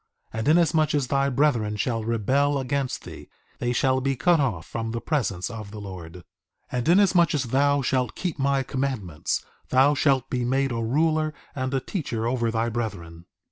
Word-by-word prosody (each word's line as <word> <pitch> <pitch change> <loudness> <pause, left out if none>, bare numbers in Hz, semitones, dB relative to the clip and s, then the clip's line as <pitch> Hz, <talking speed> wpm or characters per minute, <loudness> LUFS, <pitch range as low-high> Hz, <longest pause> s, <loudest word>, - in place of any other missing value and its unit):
2:21 110 - -3
And 110 - -2
inasmuch 155 -1 +3
as 140 -3 0
thy 140 0 +2
brethren 125 -6 +1
shall 115 0 -1
rebel 130 +6 +1
against 130 -1 -2
thee, - - -10 0.3
they 120 - 0
shall 130 +1 +2
be 135 +1 0
cut 165 +6 +3
off 110 - -1
from 115 -1 -4
the 115 - -2
presence 115 - -1
of 110 -3 -7
the 105 +1 -8
Lord. 90 -5 -8
2:22 90 - -11 0.5
And 125 +4 -1
inasmuch 180 -3 +4
as 140 - 0
thou 140 +3 +2
shalt 125 0 0
keep 175 -5 -3
my 135 0 +2
commandments, 130 - -2 0.2
thou 135 +3 +5
shalt 135 -3 +2
be 125 -1 -2
made 135 +2 +1
a 115 -1 -2
ruler 155 +5 +1 0.2
and 130 -1 -3
a - - +2
teacher 125 - -3
over 120 -1 0
thy 115 +1 0
brethren. 90 -8 -5
130 Hz, 185 wpm, -25 LUFS, 115-140 Hz, 0.5 s, thou